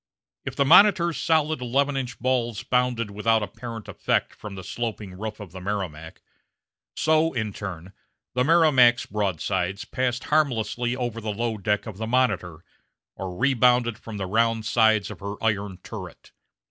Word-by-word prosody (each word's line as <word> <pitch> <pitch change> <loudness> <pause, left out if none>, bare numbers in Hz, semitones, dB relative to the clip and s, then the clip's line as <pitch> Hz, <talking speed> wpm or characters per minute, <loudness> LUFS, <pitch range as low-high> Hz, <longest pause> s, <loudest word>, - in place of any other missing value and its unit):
If - - -5
the 140 - +2
Monitor's 170 +1 +6
solid 155 -3 +1
eleven 135 +3 +1
inch 125 -2 -3
balls 120 -3 0
bounded 125 -3 0
without 110 +2 +1
apparent 115 +2 -7
effect - - -1
from 105 -2 -9
the 95 - -8
sloping 110 -4 -5
roof 110 +3 -6
of 100 -5 -9
the 95 +1 -9
Merrimac, 90 -5 -5 0.7
so, 160 +1 +2
in 110 -4 -2
turn, 95 -2 -7 0.4
the 125 - +2
Merrimac's 135 -6 +5
broadsides 100 -1 -2
passed 125 -1 -2
harmlessly 125 -5 0
over 120 -3 -3
the 110 -1 -3
low 115 +2 -2
deck 105 +1 0
of 110 -4 -8
the 110 - -3
Monitor, 110 -10 0 0.5
or 90 -2 -6
rebounded 125 -3 +3
from 110 -3 -8
the 95 - -3
round 115 +2 +1
sides 110 -3 +3
of 100 - -9
her 100 +2 -5
iron 100 -4 -1
turret. - - -9
115 Hz, 155 wpm, -25 LUFS, 100-125 Hz, 0.7 s, Monitor's